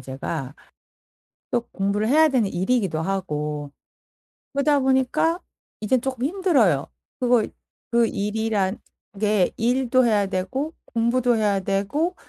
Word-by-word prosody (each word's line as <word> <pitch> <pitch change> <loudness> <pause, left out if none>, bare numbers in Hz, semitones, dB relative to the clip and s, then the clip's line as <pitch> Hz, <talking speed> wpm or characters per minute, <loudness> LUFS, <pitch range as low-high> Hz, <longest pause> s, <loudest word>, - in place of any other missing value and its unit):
제가. 135 +2 -5 1.0
또 240 - +1
공부를 200 +2 0
해야 310 +4 +5
되는 245 -8 +1
일이기도 190 -3 0
하고. 150 -5 -3 0.8
그러다 285 +1 +3
보니까 265 +6 +2 0.4
이제 220 +5 +2
조금 255 0 -2
힘들어요. 280 - +2 0.3
그리고 245 -3 +3 0.5
그 235 -1 +4
일이란 210 -1 -1 0.4
게 210 -3 +2
일도 255 +2 +2
해야 210 -3 +3
되고 260 - -3
공부도 235 +1 +1
해야 205 -3 +2
되고 205 - -1
225 Hz, 250 characters per minute, -23 LUFS, 195-260 Hz, 1.0 s, 해야